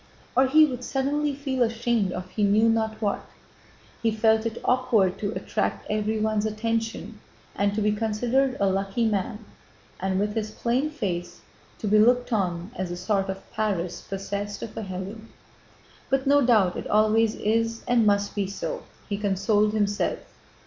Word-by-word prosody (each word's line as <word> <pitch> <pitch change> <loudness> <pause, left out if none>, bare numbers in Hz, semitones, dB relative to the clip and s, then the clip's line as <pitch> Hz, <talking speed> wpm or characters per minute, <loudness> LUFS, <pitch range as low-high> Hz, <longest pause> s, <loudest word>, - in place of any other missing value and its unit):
Or 260 +1 +5
he 310 +4 +7
would 250 -4 -5
suddenly 280 +3 0
feel 270 -2 -3
ashamed 230 -3 +1
of 185 0 -5
he 210 - -1
knew 210 +3 +4
not 220 -1 +1
what. 205 -2 -1 0.8
He 230 - +2
felt 220 +1 +2
it 225 0 -5
awkward 240 -7 +2
to 200 -1 -2
attract - - -2
everyone's 215 0 0
attention 225 +1 -3 0.4
and 200 0 +1
to 215 - 0
be 210 - +3
considered 240 +5 0
a 200 - +3
lucky 195 +4 0
man 210 +1 -2 0.5
and, 190 0 0
with 210 +1 0
his 215 -1 -2
plain 245 +7 0
face, 180 - -4 0.4
to 215 - -4
be 210 +1 +5
looked 245 +2 +3
on 180 -2 -1
as 185 -5 -3
a 175 - -4
sort 195 +1 0
of 190 0 -6
Paris 190 -5 -2
possessed 200 +1 -5
of 215 - -7
a - - -4
Helen. 195 +3 -7 0.8
"But 270 0 +1
no 285 +1 +5
doubt 215 -7 +3
it - - -5
always 215 +1 +3
is 225 +1 0
and 240 -2 +4
must 205 -1 +2
be 200 -2 -1
so!" - - -4 0.3
he 200 -1 -3
consoled 205 +1 +2
himself. 205 -1 0
215 Hz, 165 wpm, -25 LUFS, 200-235 Hz, 0.8 s, he